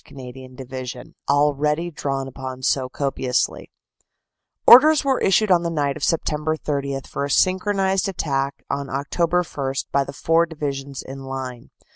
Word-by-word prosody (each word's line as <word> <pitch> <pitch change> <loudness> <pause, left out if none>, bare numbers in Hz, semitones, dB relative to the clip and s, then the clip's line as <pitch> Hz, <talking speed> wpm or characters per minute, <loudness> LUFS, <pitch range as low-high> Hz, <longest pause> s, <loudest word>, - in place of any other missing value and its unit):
Canadian 130 -1 -11
Division, 130 -1 -7 0.2
already 150 +3 +2
drawn 135 -3 -3
upon 130 0 -7
so 130 0 +1
copiously: 135 -2 -1 1.0
"Orders 300 +4 +8
were 265 -2 +1
issued 195 +2 +3
on 175 -2 +5
the 170 - -2
night 145 -4 -1
of 155 - -9
Sept. 155 0 0
30 140 -2 -2
for - - -4
a 140 - -2
synchronized 190 +4 +2
attack 140 -6 -2
on 140 0 -3
Oct. 165 +6 -1
1 135 -1 -1 0.2
by 140 - +2
the 140 - -8
four 165 +4 +2
divisions 140 -4 -5
in 135 +1 -8
line. 130 -3 -6
140 Hz, 145 wpm, -22 LUFS, 135-170 Hz, 1.0 s, Orders